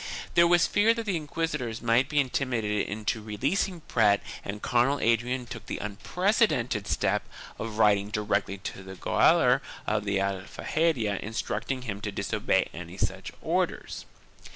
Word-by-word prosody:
There 170 Hz, 0 st, +6 dB
was 175 Hz, 0 st, +5 dB
fear 220 Hz, +3 st, +3 dB
that 230 Hz, -1 st, -4 dB
the 200 Hz, -4 st, 0 dB
inquisitors 150 Hz, -7 st, -3 dB
might 120 Hz, +2 st, +2 dB
be 150 Hz, -, +2 dB
intimidated 120 Hz, -6 st, 0 dB
into 110 Hz, +2 st, -2 dB
releasing 140 Hz, -, -1 dB
Prat 105 Hz, -7 st, +3 dB, 0.2 s
and 100 Hz, +1 st, -5 dB
Cardinal 125 Hz, +6 st, +2 dB
Adrian 120 Hz, +2 st, +1 dB
took -, -, -9 dB
the -, -, -3 dB
unprecedented 125 Hz, -, 0 dB
step -, -, +1 dB, 0.4 s
of 110 Hz, -1 st, -5 dB
writing 105 Hz, -2 st, +4 dB
directly 105 Hz, -2 st, -1 dB
to 95 Hz, 0 st, -7 dB
the 95 Hz, 0 st, -9 dB
gaoler -, -, +4 dB, 0.2 s
of 105 Hz, -, 0 dB
the 100 Hz, -1 st, +1 dB
Aljaferia 100 Hz, -, 0 dB
instructing 115 Hz, +4 st, -3 dB
him 105 Hz, -4 st, -5 dB
to 105 Hz, -, -3 dB
disobey 100 Hz, -, 0 dB
any 85 Hz, +2 st, -8 dB
such -, -, -2 dB
orders. -, -, -2 dB
115 Hz, 145 wpm, -28 LUFS, 105-145 Hz, 0.4 s, There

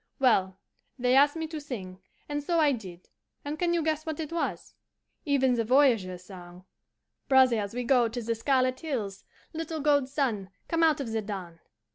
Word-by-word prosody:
"Well, 190 Hz, -8 st, +2 dB, 0.4 s
they 250 Hz, 0 st, +2 dB
asked 285 Hz, +2 st, +5 dB
me 325 Hz, 0 st, -3 dB
to 315 Hz, -2 st, -5 dB
sing, 190 Hz, -10 st, -7 dB, 0.3 s
and 290 Hz, 0 st, -2 dB
so 335 Hz, +2 st, +1 dB
I 300 Hz, -2 st, +4 dB
did; 185 Hz, -8 st, -7 dB, 0.4 s
and 300 Hz, +2 st, -4 dB
can 350 Hz, -1 st, +1 dB
you 340 Hz, -2 st, +1 dB
guess 310 Hz, -1 st, -1 dB
what 315 Hz, -1 st, -5 dB
it 315 Hz, -1 st, -4 dB
was? 335 Hz, -, -3 dB, 0.5 s
Even 270 Hz, -3 st, +2 dB
the 235 Hz, -1 st, +1 dB
voyageurs' 225 Hz, -8 st, +2 dB
song, 180 Hz, -1 st, -12 dB, 0.6 s
'Brothers, 240 Hz, -6 st, +3 dB
we 245 Hz, -, -2 dB
go 245 Hz, -1 st, +3 dB
to 240 Hz, +2 st, -5 dB
the 230 Hz, +1 st, 0 dB
Scarlet 255 Hz, +2 st, +1 dB
Hills, 220 Hz, -11 st, -4 dB, 0.3 s
(Little 320 Hz, 0 st, -4 dB
gold 285 Hz, -2 st, +2 dB
sun, 235 Hz, -9 st, -1 dB, 0.2 s
come 330 Hz, 0 st, 0 dB
out 315 Hz, -3 st, +3 dB
of 235 Hz, -5 st, -4 dB
the 220 Hz, 0 st, -1 dB
dawn!) 190 Hz, -5 st, -7 dB
255 Hz, 180 wpm, -28 LUFS, 210-295 Hz, 0.6 s, asked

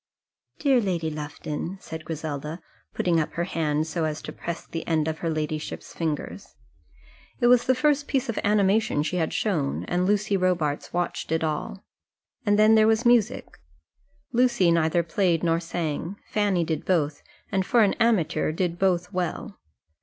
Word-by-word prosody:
"Dear 270 Hz, -4 st, +3 dB
Lady 170 Hz, -6 st, -1 dB
Lufton!" 150 Hz, +4 st, -5 dB
said 160 Hz, -4 st, -8 dB
Griselda, 155 Hz, 0 st, -5 dB, 0.4 s
putting 170 Hz, -2 st, +2 dB
up 155 Hz, -, -2 dB
her 170 Hz, -, -1 dB
hand 155 Hz, -4 st, -1 dB
so 160 Hz, 0 st, -2 dB
as 155 Hz, -1 st, -2 dB
to -, -, -6 dB
press 170 Hz, 0 st, -5 dB
the 165 Hz, -, -6 dB
end 160 Hz, -2 st, +1 dB
of 160 Hz, 0 st, -3 dB
her 165 Hz, -, -2 dB
ladyship's 155 Hz, -1 st, -4 dB
fingers. 160 Hz, -3 st, -4 dB, 0.8 s
It -, -, +1 dB
was 245 Hz, 0 st, +5 dB
the 260 Hz, -, +4 dB
first 290 Hz, +1 st, +2 dB
piece 270 Hz, -1 st, 0 dB
of 230 Hz, -, -2 dB
animation 205 Hz, -5 st, +2 dB
she 165 Hz, +4 st, -2 dB
had 160 Hz, -2 st, 0 dB
shown, 160 Hz, -10 st, -1 dB
and 180 Hz, +1 st, 0 dB
Lucy 205 Hz, 0 st, +1 dB
Robarts 175 Hz, -6 st, 0 dB
watched 175 Hz, -2 st, -2 dB
it 160 Hz, 0 st, +1 dB
all. 160 Hz, +5 st, -3 dB, 0.6 s
And 205 Hz, 0 st, +4 dB
then 215 Hz, +1 st, +6 dB
there 220 Hz, -1 st, +6 dB
was 225 Hz, +2 st, +2 dB
music. 240 Hz, -3 st, +2 dB, 0.7 s
Lucy 240 Hz, -7 st, +3 dB
neither 165 Hz, +1 st, +2 dB
played 170 Hz, -1 st, +1 dB
nor 165 Hz, -1 st, +2 dB
sang; 165 Hz, +1 st, -3 dB, 0.2 s
Fanny 200 Hz, -5 st, +2 dB
did 160 Hz, -2 st, -2 dB
both, 150 Hz, -5 st, 0 dB, 0.3 s
and 190 Hz, -1 st, +1 dB
for 230 Hz, +4 st, +4 dB
an 200 Hz, -, +3 dB
amateur 220 Hz, -10 st, +2 dB
did 170 Hz, +1 st, -2 dB
both 180 Hz, -1 st, +1 dB
well. 185 Hz, +4 st, -3 dB
175 Hz, 165 wpm, -25 LUFS, 160-205 Hz, 0.8 s, then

